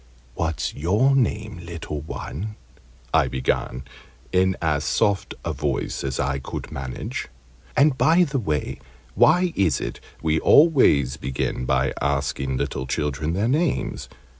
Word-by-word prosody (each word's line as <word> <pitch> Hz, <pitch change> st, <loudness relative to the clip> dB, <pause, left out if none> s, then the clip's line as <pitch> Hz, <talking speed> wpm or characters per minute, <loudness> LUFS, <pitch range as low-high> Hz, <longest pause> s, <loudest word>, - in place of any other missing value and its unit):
"What's 80 Hz, +4 st, -2 dB
your 105 Hz, -, +2 dB
name, 110 Hz, -6 st, 0 dB
little 80 Hz, -3 st, -5 dB
one?" 95 Hz, +7 st, -6 dB, 0.6 s
I 80 Hz, -4 st, +4 dB
began, 65 Hz, 0 st, -1 dB, 0.5 s
in 95 Hz, 0 st, +2 dB
as 75 Hz, -3 st, 0 dB
soft 100 Hz, -2 st, +1 dB
a -, -, -1 dB
voice -, -, -2 dB
as 65 Hz, -1 st, -2 dB
I 70 Hz, +1 st, 0 dB
could -, -, -6 dB
manage. 65 Hz, -2 st, -5 dB, 0.5 s
And, 145 Hz, 0 st, +5 dB
by 170 Hz, +3 st, +5 dB
the 140 Hz, -4 st, -1 dB
way, 75 Hz, -, -2 dB, 0.3 s
why 175 Hz, -, +4 dB
is 95 Hz, -5 st, +2 dB
it -, -, -5 dB, 0.2 s
we 80 Hz, 0 st, +2 dB
always 75 Hz, -, +5 dB
begin 65 Hz, -1 st, -2 dB
by 65 Hz, +1 st, +1 dB
asking 70 Hz, -1 st, -1 dB
little 65 Hz, -, -3 dB
children 75 Hz, +3 st, -1 dB
their 100 Hz, +5 st, +1 dB
names? 150 Hz, +3 st, 0 dB
80 Hz, 135 wpm, -23 LUFS, 70-110 Hz, 0.6 s, And